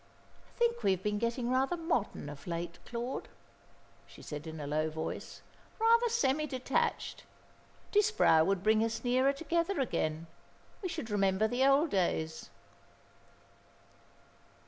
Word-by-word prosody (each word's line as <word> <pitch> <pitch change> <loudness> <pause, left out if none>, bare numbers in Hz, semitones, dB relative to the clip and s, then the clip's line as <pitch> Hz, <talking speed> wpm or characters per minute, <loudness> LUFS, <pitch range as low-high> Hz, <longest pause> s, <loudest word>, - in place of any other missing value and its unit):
"I - - -26
think 475 0 +1
we - - +2
have 190 0 -5
been 210 0 0
getting 235 +2 -1
rather 265 +7 +1
modern 325 - -1
of 145 +1 -9
late, 170 0 -4
Claude," 240 +2 -4 0.8
she - - -14
said 150 +1 -6
in 160 0 -7
a 145 - -5
low 155 +2 0
voice, 160 +1 -6 0.3
"rather 465 +2 +4
semi 305 - +1
detached. 260 -1 -1 0.7
Disbrowe 415 - +4
would 195 +1 0
bring 220 +1 +4
us 225 0 -2
nearer 255 +2 +3
together 335 +5 -1
again. 165 - -1 0.6
We 370 - -3
should 315 -10 -5
remember 195 +1 +2
the 245 +4 0
old 275 +4 +4
days." 160 -4 -1
235 Hz, 135 wpm, -32 LUFS, -, 0.8 s, rather